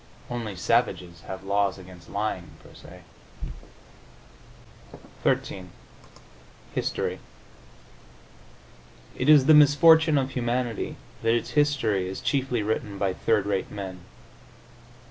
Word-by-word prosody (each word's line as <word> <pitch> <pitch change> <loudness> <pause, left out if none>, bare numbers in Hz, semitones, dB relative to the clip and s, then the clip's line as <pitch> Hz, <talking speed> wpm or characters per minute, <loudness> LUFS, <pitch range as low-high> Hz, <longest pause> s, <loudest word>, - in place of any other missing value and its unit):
Only 115 -5 -4
savages 90 -4 0
have 95 0 -7
laws 100 0 0
against 90 -2 -14
lying 100 -3 -3
per - - -16
se. - - -14 2.2
XIII 95 -1 -1 1.1
HISTORY - - -2 2.0
It 130 - 0
is 145 -4 +7
the 155 - +7
misfortune 155 +1 +6
of 135 -1 0
humanity 120 -2 -2 0.3
that 115 +1 +2
its 120 - -2
history 115 -11 +1
is 95 - -5
chiefly 130 -2 -1
written 105 -1 -2
by 95 -2 0
third 105 +1 +1
rate 100 -2 -1
men. 95 -3 -7
110 Hz, 105 wpm, -26 LUFS, 95-130 Hz, 2.2 s, is